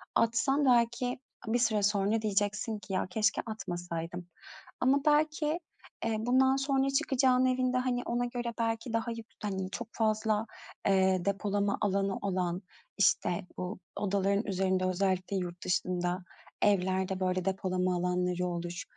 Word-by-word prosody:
atsan 270 +5 +2
belki 245 0 +2 0.3
bir 235 +2 +2
süre 220 -3 +2
sonra 205 +2 +2
diyeceksin 210 +1 0
ki 205 - -8
"Ya, 185 - 0
keşke 220 +3 +1
atmasaydım." 175 -5 -5 0.5
Ama 270 +3 +3
belki, 305 +1 +2 0.5
eee, 225 -1 +1
bundan 260 +3 +4
sonra 270 0 +1
çıkacağının 260 -1 +3
evinde, 255 0 +2
hani, 250 -1 0
ona 240 +1 0
göre 240 -1 -3
belki 225 +1 -1
daha 230 +1 0
yük 230 -1 -7 0.2
hani, 190 -2 -2
çok 230 +3 -5
fazla, 215 -1 +1 0.4
eee, 190 -2 +3
depolama 200 0 0
alanı 195 -1 +1
olan, 185 -2 -1 0.4
işte, 180 -1 +2
bu 180 0 -4 0.2
odaların 200 +1 +1
üzerinde 190 -1 +1
özellikle 185 +1 0
yurt 175 -1 -4
dışında 180 0 0 0.4
evlerde 190 -1 +2
böyle 185 -1 0
depolama 185 -1 0
alanları 180 0 0
olur, 175 0 -4
205 Hz, 135 wpm, -31 LUFS, 185-235 Hz, 0.5 s, bundan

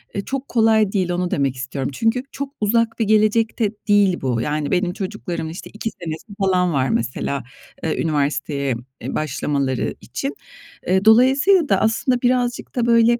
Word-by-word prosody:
eee, 200 - -1
çok 270 0 -4
kolay 220 -3 +3
değil, 185 -4 0
onu 175 0 -1
demek 135 -2 0
istiyorum. 135 +1 -4
Çünkü 225 - +1
çok 280 0 -5
uzak 225 +2 +1
bir 225 - +2
gelecekte 215 +1 +2 0.2
değil 205 -3 +3
bu. 125 -4 0
Yani, 150 +2 -2
benim 180 -1 +1
çocuklarımın 180 -4 -4
işte 170 - -8
2 220 +2 -3
senesi 160 -1 -5
falan 180 -3 +2
var 130 -2 +1
mesela, 125 +3 -1 0.4
eee, 160 - -1
üniversiteye, 140 -3 -1 0.3
eee, - - -4
başlamaları 140 -3 -1
için. 275 +1 -4 0.5
Eee, 190 +2 +2
dolayısıyla 270 - +5
da, 195 - +3
aslında, 245 +3 +1
birazcık 245 -1 0
da, 240 -2 +1
böyle, 235 0 +4
195 Hz, 160 wpm, -21 LUFS, 150-230 Hz, 0.5 s, dolayısıyla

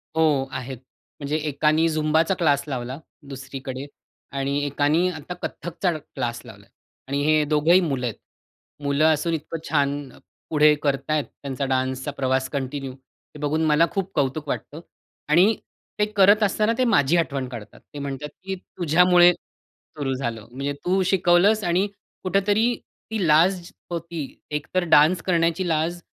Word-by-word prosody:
हो, 155 -4 +3
आहेत. 130 0 -5 0.4
म्हणजे 145 +1 -2
एकानी 155 +3 +2
झुंबाचा 155 +3 +2
क्लास 145 -5 +2
लावला 130 -1 -4 0.3
दुसरीकडे 135 0 -7 0.5
आणि 140 +1 -1
एकानी 145 +5 +2
आता 160 +1 -6
कथकचा 175 +2 -2
क्लास 125 -6 -5
लावला - - -13 0.4
आणि 140 +1 -1
हे 155 0 +3
दोघंही 155 +5 +4
मुलं 135 -7 -1
आहेत. 115 - -3 0.7
मुलं 140 +2 +2
असून 165 +2 -1
इतकं 160 +1 -4
छान 140 -1 0 0.4
पुढे 150 -1 +5
करत 140 +1 -1
आहेत, 150 -2 +2 0.2
त्यांचा 140 0 -3
डान्सचा 130 +1 -1
प्रवास 130 -1 -1
कंटिन्यू, 135 -1 -4
हे 135 +3 -19
बघून 150 +2 0
मला 155 +2 +4
खूप 195 -1 -3
कौतुक 145 +1 -1
वाटतं 155 +3 -5 0.5
आणि 185 +8 +5 0.4
ते 210 - +4
करत 205 +2 +6
असताना 215 +3 +2
ते 255 - +2
माझी 145 - +3
आठवण 140 -6 -1
काढतात. 110 -4 -10
ते 145 - -6
म्हणतात 140 +1 -5
की 190 0 -3
"तुझ्यामुळे 180 0 +4
सुरू 140 -5 -8
झालं. 120 -5 -4
म्हणजे 140 +3 -3
तू 190 +2 +2
शिकवलंस 190 +3 +3
आणि 180 +3 +1 0.4
कुठेतरी 205 +5 +2 0.4
ती 205 -6 0
लाज 170 +5 +4 0.3
होती. 170 -2 -4 0.3
एकतर 150 +5 -1
डान्स 155 +5 +5
करण्याची 170 0 +1
लाज 165 +2 0
150 Hz, 140 wpm, -23 LUFS, 140-175 Hz, 0.7 s, करत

